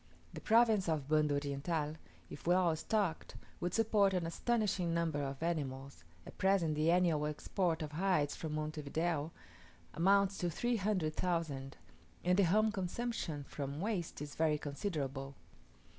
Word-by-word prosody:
The -, -, -7 dB
province 220 Hz, -5 st, +4 dB
of 150 Hz, -4 st, -1 dB
Banda 150 Hz, -1 st, +3 dB
Oriental, 145 Hz, +2 st, -2 dB, 0.3 s
if -, -, -10 dB
well 175 Hz, -2 st, +4 dB
stocked, 190 Hz, 0 st, -1 dB, 0.2 s
would 175 Hz, 0 st, -2 dB
support 210 Hz, -4 st, +3 dB
an 175 Hz, -2 st, 0 dB
astonishing 190 Hz, -2 st, 0 dB
number 165 Hz, -3 st, 0 dB
of 140 Hz, +2 st, -4 dB
animals, 140 Hz, -, -3 dB, 0.2 s
at -, -, -12 dB
present 190 Hz, -5 st, +3 dB
the 155 Hz, +2 st, +1 dB
annual 170 Hz, -4 st, +3 dB
export 165 Hz, +2 st, -1 dB
of 150 Hz, -, -6 dB
hides 160 Hz, -3 st, +1 dB
from 155 Hz, -2 st, -5 dB
Monte 155 Hz, 0 st, -3 dB
Video 160 Hz, +1 st, -1 dB, 0.6 s
amounts 195 Hz, +3 st, +3 dB
to 175 Hz, -, 0 dB
three 240 Hz, +8 st, 0 dB
hundred 185 Hz, -6 st, 0 dB
thousand; 155 Hz, -6 st, -2 dB, 0.5 s
and 180 Hz, +2 st, +3 dB
the 195 Hz, -, +6 dB
home 215 Hz, +5 st, +3 dB
consumption, 190 Hz, -5 st, -3 dB
from 140 Hz, 0 st, -5 dB
waste, 180 Hz, -6 st, -2 dB
is 145 Hz, -, -7 dB
very 155 Hz, -1 st, +2 dB
considerable. 140 Hz, -3 st, -4 dB
165 Hz, 145 wpm, -35 LUFS, 150-190 Hz, 0.6 s, the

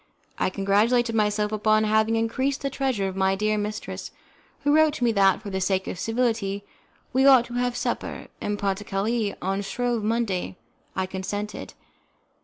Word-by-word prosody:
I -, -, +2 dB
congratulated 215 Hz, +5 st, +2 dB
myself 210 Hz, -1 st, +1 dB
upon 215 Hz, 0 st, +3 dB
having 220 Hz, +1 st, +2 dB
increased 260 Hz, +5 st, 0 dB
the 275 Hz, -, -1 dB
treasure 255 Hz, -8 st, 0 dB
of 190 Hz, -, -5 dB
my 190 Hz, 0 st, +2 dB
dear 215 Hz, +2 st, +1 dB
mistress, 210 Hz, 0 st, -4 dB, 0.5 s
who 290 Hz, 0 st, +3 dB
wrote 315 Hz, -1 st, +4 dB
to 250 Hz, -, -3 dB
me 235 Hz, -, +4 dB
that, 195 Hz, -1 st, +3 dB
for 200 Hz, -, -6 dB
the 190 Hz, 0 st, -2 dB
sake 190 Hz, 0 st, +1 dB
of 175 Hz, -, -5 dB
civility, 225 Hz, -4 st, -1 dB, 0.5 s
we 265 Hz, +2 st, +4 dB
ought 260 Hz, -3 st, +7 dB
to 240 Hz, -, -10 dB
have 245 Hz, 0 st, 0 dB
a -, -, -12 dB
supper -, -, -3 dB, 0.2 s
'en 205 Hz, 0 st, -2 dB
partie 200 Hz, 0 st, -1 dB
carree' 205 Hz, +2 st, -1 dB
on 195 Hz, +2 st, 0 dB
Shrove 235 Hz, +2 st, -1 dB
Monday. 215 Hz, -5 st, -1 dB, 0.4 s
I 190 Hz, -, 0 dB
consented. 200 Hz, +3 st, -5 dB
215 Hz, 175 wpm, -25 LUFS, 195-240 Hz, 0.5 s, ought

